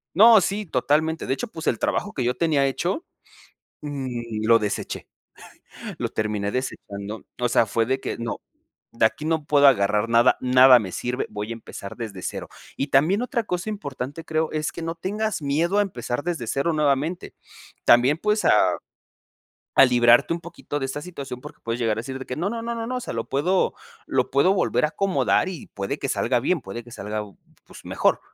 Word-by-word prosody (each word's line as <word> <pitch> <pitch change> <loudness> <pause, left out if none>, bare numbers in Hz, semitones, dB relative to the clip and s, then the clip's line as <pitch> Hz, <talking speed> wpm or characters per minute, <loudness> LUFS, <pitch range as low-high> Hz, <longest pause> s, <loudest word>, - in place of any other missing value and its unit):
No, 220 +3 +8
sí, 200 +2 -2
totalmente, 155 +4 +1
de - - 0
hecho, 245 - -4
pues, 165 -6 -8
el - - +1
trabajo 205 - -1
que 130 - -2
yo 125 +1 0
tenía 145 -3 +2
hecho, 175 - -2 0.8
mm, 120 -6 -4
lo 115 0 +7
deseché, 105 -2 -4 0.9
lo - - -2
terminé 105 -2 -2
desechando. 105 -4 -5
O 125 - +2
sea, 120 -1 +3
fue 115 +2 0
de 130 +2 -1
que - - -4
no, 115 0 -4 0.5
de 115 - +2
aquí 115 - 0
no 160 -1 0
puedo 145 -1 +5
agarrar 105 -3 +3
nada, 115 0 +5
nada 130 0 +7
me 100 -5 -5
sirve, 125 +6 -2
voy 105 +1 -5
a - - -1
empezar 110 -3 -9
desde 105 -6 -7
0. - - -5 0.3
Y 140 - -2
también 155 - +3
otra 245 -1 -1
cosa 180 +2 -3
importante, 145 -6 -6
creo, 160 0 -1
es 155 0 -2
que - - -7
no 165 0 -3
tengas 205 +3 -2
miedo 160 +7 +1
a - - +5
empezar 125 - -4
desde 165 -9 -3
0 140 +8 0
nuevamente. 150 +3 0 0.5
También 125 +5 +5
pues, 210 +4 0
a - - +6 1.2
a - - +8
librarte 120 +3 +4
un - - -6
poquito 170 -4 -6
de 135 - -2
esta 135 +2 -4
situación 140 -7 -7
porque - - -11
puedes 115 +1 -3
llegar 110 -2 +1
a - - -2
decir 130 +2 -6
de 130 - -7
que 125 - -4
no, 170 +7 -1
no, 230 +1 -4
no, 235 +1 -3
no, 230 -1 -4
no, 255 +1 -2
o - - -2
sea, - - -6
lo 115 0 -3
puedo 175 +8 +1 0.3
lo - - 0
puedo 140 +8 +4
volver 190 - +1
a - - -2
acomodar, 195 +1 +1
y 175 -6 -7
puede 100 -1 -4
que - - -3
salga - - +1
bien, 160 +6 0
puede 120 0 -7
que 120 - -15
salga 105 -1 -4
b 100 -2 -13 0.3
pues, - - -14
mejor. - - +1
140 Hz, 205 wpm, -24 LUFS, 120-170 Hz, 1.2 s, No